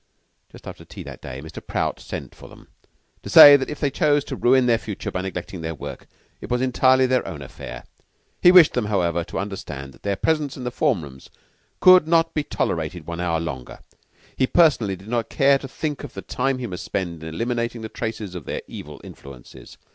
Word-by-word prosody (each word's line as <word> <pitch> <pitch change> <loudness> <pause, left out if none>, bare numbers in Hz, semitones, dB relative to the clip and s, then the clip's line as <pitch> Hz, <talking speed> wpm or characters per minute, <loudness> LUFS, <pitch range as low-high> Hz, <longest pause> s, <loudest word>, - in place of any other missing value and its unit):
Just - - -14
after - - -9
tea - - -10
that - - -10
day, 65 +2 -8
Mr. 80 - -10
Prout - - -2
sent - - -7
for - - -14
them - - -17 0.5
to - - -9
say 145 0 +11
that 135 -2 0
if 150 - -6
they 145 -2 0
chose 145 -1 +2
to 135 - -6
ruin 130 +1 +3
their 115 -2 +3
future 105 -4 -6
by 90 - -3
neglecting 90 -1 -6
their 80 0 -4
work, 65 - -9 0.3
it - - -8
was 125 - 0
entirely 130 0 +3
their 130 0 +1
own 75 -4 -7
affair. - - -9 0.6
He 180 - +8
wished 180 -4 +7
them, 125 -3 -1
however, 85 -5 0
to - - -7
understand 75 -9 -6
that - - -20
their 100 -1 -1
presence 150 +4 -1
in 130 - -7
the 125 - -3
form 125 - 0
rooms 65 -2 -12 0.5
could 185 -3 +7
not 165 0 +2
be 150 - 0
tolerated 85 - -3
one 85 0 -6
hour 85 -2 0
longer. 70 -7 -6 0.6
He 130 - +1
personally 135 - +3
did 95 +3 -15
not 115 -1 -2
care 140 0 +3
to 135 - -8
think 150 +2 -4
of 145 - -9
the - - -7
time 135 +1 -1
he 125 - -5
must 90 -6 -6
spend 85 -4 -4
in 80 - -6
eliminating 115 +4 -3
the 110 - -5
traces 110 -5 -5
of 90 -4 -8
their - - -5
evil 75 -1 -10
influences. 70 -3 -13
115 Hz, 215 wpm, -22 LUFS, 85-135 Hz, 0.6 s, say